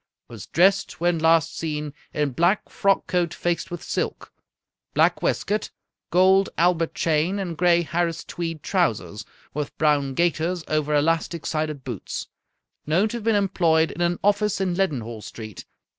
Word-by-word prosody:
Was 115 Hz, -5 st, -9 dB
dressed, 195 Hz, 0 st, +2 dB
when 175 Hz, -1 st, +1 dB
last 160 Hz, -1 st, +3 dB
seen, 150 Hz, -2 st, -3 dB, 0.2 s
in 150 Hz, -2 st, 0 dB
black 175 Hz, +9 st, +1 dB
frock 195 Hz, 0 st, +1 dB
coat 175 Hz, -2 st, 0 dB
faced 175 Hz, -1 st, -1 dB
with 175 Hz, -1 st, -6 dB
silk, -, -, -3 dB, 0.6 s
black -, -, +3 dB
waistcoat, 210 Hz, 0 st, -1 dB, 0.4 s
gold 190 Hz, +2 st, +4 dB
Albert 170 Hz, -1 st, +2 dB
chain, 165 Hz, +4 st, +1 dB
and 185 Hz, -4 st, -3 dB
gray 175 Hz, +1 st, +3 dB
Harris 165 Hz, 0 st, -1 dB
tweed 165 Hz, -3 st, -5 dB
trousers, 110 Hz, -, -1 dB, 0.3 s
with 150 Hz, 0 st, -4 dB
brown 145 Hz, -3 st, +2 dB
gaiters 170 Hz, +1 st, 0 dB
over 150 Hz, -1 st, 0 dB
elastic 165 Hz, +2 st, 0 dB
sided 155 Hz, -3 st, -2 dB
boots. 120 Hz, -7 st, -5 dB, 0.6 s
Known 180 Hz, +8 st, +2 dB
to 240 Hz, -, -4 dB
have 230 Hz, -, -8 dB
been 225 Hz, -1 st, +2 dB
employed 170 Hz, -5 st, +2 dB
in 175 Hz, -, -6 dB
an 175 Hz, 0 st, +1 dB
office 205 Hz, 0 st, +2 dB
in 190 Hz, -2 st, 0 dB
Leadenhall 125 Hz, -, -2 dB
Street. 110 Hz, -2 st, -9 dB
165 Hz, 150 wpm, -24 LUFS, 150-180 Hz, 0.6 s, gold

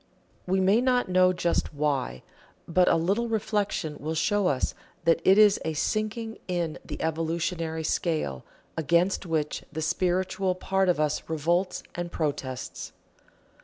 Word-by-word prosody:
We 190 Hz, +1 st, +2 dB
may 195 Hz, +5 st, +4 dB
not 250 Hz, -4 st, +2 dB
know 185 Hz, 0 st, +5 dB
just 170 Hz, -3 st, -1 dB
why, 140 Hz, -, -1 dB, 0.4 s
but 180 Hz, +2 st, +3 dB
a -, -, +5 dB
little 200 Hz, +8 st, +1 dB
reflection 205 Hz, -8 st, -1 dB
will 155 Hz, +2 st, -3 dB
show 205 Hz, +4 st, +2 dB
us 135 Hz, -5 st, 0 dB, 0.3 s
that 165 Hz, 0 st, +4 dB
it 190 Hz, +1 st, +6 dB
is 210 Hz, -1 st, +6 dB
a 160 Hz, -, -2 dB
sinking 215 Hz, +7 st, -2 dB
in 175 Hz, -4 st, -2 dB
the -, -, -7 dB
evolutionary 160 Hz, 0 st, -2 dB
scale, 155 Hz, -, -1 dB, 0.3 s
against 170 Hz, +4 st, +1 dB
which 155 Hz, -2 st, -1 dB
the 155 Hz, -, -5 dB
spiritual 185 Hz, +3 st, 0 dB
part 190 Hz, 0 st, +1 dB
of 175 Hz, -, +2 dB
us 150 Hz, 0 st, -1 dB
revolts 170 Hz, +4 st, 0 dB
and 175 Hz, 0 st, -4 dB
protests. 140 Hz, -5 st, -4 dB
175 Hz, 140 wpm, -27 LUFS, 160-190 Hz, 0.4 s, it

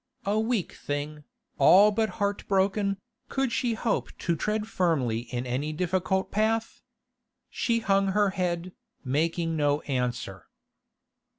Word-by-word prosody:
A 205 Hz, +2 st, +1 dB
weak 220 Hz, -4 st, -1 dB
thing, 145 Hz, +1 st, -5 dB, 0.3 s
all 195 Hz, +9 st, +7 dB
but 220 Hz, +1 st, +1 dB
heart 205 Hz, -1 st, -1 dB
broken, 195 Hz, +1 st, +1 dB, 0.3 s
could 270 Hz, -2 st, 0 dB
she 235 Hz, -1 st, 0 dB
hope 225 Hz, +1 st, -1 dB
to 170 Hz, -, 0 dB
tread 210 Hz, +6 st, -1 dB
firmly 130 Hz, -, 0 dB
in 125 Hz, 0 st, -2 dB
any 130 Hz, +5 st, -2 dB
difficult 185 Hz, +3 st, 0 dB
path? 220 Hz, +2 st, 0 dB, 0.7 s
She 230 Hz, -1 st, 0 dB
hung 195 Hz, -1 st, +2 dB
her 200 Hz, 0 st, +2 dB
head, 180 Hz, -1 st, -2 dB, 0.3 s
making 165 Hz, +4 st, 0 dB
no 145 Hz, -1 st, +1 dB
answer. 125 Hz, -8 st, -3 dB
185 Hz, 125 wpm, -27 LUFS, 150-210 Hz, 0.7 s, all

